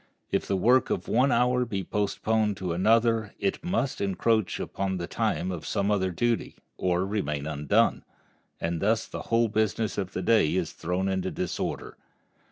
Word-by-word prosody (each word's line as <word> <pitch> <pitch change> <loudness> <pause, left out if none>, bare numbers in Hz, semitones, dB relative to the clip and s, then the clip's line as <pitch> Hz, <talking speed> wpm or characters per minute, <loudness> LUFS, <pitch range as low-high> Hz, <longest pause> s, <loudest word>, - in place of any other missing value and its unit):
If - - 0
the 95 - +1
work 125 +7 +4
of - - -2
one 130 +4 +3
hour 125 -1 +3
be 100 -5 -3
postponed 105 +2 0
to 90 -2 -2
another 110 +3 +2
it 195 -3 -2
must 165 -7 -1
encroach 100 +1 +1
upon 95 -1 -2
the 85 - -3
time 90 +1 -1
of 85 -4 -5
some 100 0 0
other 95 -2 +1
duty, 115 +6 -1 0.2
or 90 0 0
remain 75 -8 -2
undone, 75 -2 +1 0.6
and 85 0 -2
thus 110 +2 +2
the - - -7
whole 115 0 +3
business 110 -1 0
of 95 -2 -4
the 95 - -3
day 90 -6 +3
is 90 -4 -1
thrown 90 +3 -2
into 95 -1 -1
disorder. 90 -1 -4
100 Hz, 170 wpm, -27 LUFS, 90-115 Hz, 0.6 s, work